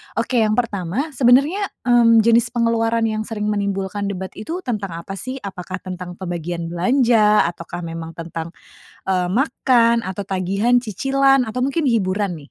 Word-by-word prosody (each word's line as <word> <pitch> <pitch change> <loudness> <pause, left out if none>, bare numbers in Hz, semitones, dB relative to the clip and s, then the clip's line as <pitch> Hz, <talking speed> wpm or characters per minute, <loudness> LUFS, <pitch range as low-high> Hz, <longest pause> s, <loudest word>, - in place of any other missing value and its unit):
Oke 250 -2 0
yang 215 -1 +2
pertama, 220 - -2
sebenarnya, 280 +10 +3 0.2
mmm, 230 -2 +5
jenis 230 0 +4
pengeluaran 230 -1 +1
yang 215 -1 -1
sering 210 -2 -4
menimbulkan 200 0 -2
debat 190 -1 -5
itu 335 +11 -5
tentang 200 -8 -3
apa 195 -1 -7
sih? 255 +1 -5
Apakah 185 -1 -7
tentang 180 -1 -7
pembagian 175 -2 -5
belanja, 215 +3 +3
ataukah 175 +1 -8
memang 165 0 -7
tentang, 165 0 -7 0.5
eee, 180 -2 +1
makan 235 -2 +2
atau 190 +1 -5
tagihan, 195 +6 +1
cicilan, 270 +3 +2
atau 250 +3 -1
mungkin 280 +2 0
hiburan 200 -4 0
nih? - - -20
215 Hz, 150 wpm, -20 LUFS, 185-240 Hz, 0.5 s, mmm